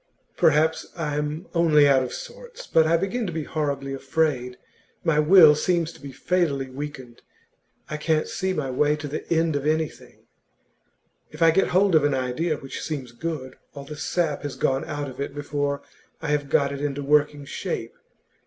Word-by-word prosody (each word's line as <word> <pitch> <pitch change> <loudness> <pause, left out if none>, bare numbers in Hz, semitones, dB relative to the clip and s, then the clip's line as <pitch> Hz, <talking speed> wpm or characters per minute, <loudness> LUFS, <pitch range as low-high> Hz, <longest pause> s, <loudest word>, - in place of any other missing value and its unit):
'Perhaps 155 +1 +3
I 155 -4 -2
am 150 +3 -3
only 155 -4 +5
out 135 -2 +5
of 125 - -3
sorts. - - -9
But 160 -1 +3
I 165 +1 +4
begin 195 +6 -2
to - - -3
be 160 -1 -3
horribly 140 -3 -3
afraid. 135 -2 -1 0.5
My 165 -3 +2
will 155 0 +8
seems 170 +2 0
to - - -17
be 140 -1 -8
fatally 140 -3 -1
weakened. 130 -3 -8 0.7
I 150 - -4
can't 155 0 0
see 190 0 -2
my 145 -7 -2
way 150 +3 +2
to 150 -1 -6
the 150 +4 -6
end 165 -2 +2
of 145 +1 -1
anything; 155 0 -3 1.0
if 155 +2 -2
I 165 - +7
get 195 +4 +2
hold 190 +1 +3
of 155 -2 +5
an 145 -2 +2
idea 135 +5 -1
which 135 - -7
seems 140 -6 -5
good, 130 0 -5 0.2
all 140 -1 -8
the 150 - -8
sap 170 +3 -1
has 145 -2 -5
gone 135 0 0
out 145 -1 -4
of 130 +1 -8
it 140 0 -4
before 145 -1 -2 0.4
I 165 - -4
have 145 -1 0
got 140 +1 +2
it 140 0 -5
into 145 -1 -2
working 145 0 +2
shape. - - -4
150 Hz, 185 wpm, -24 LUFS, 140-160 Hz, 1.0 s, will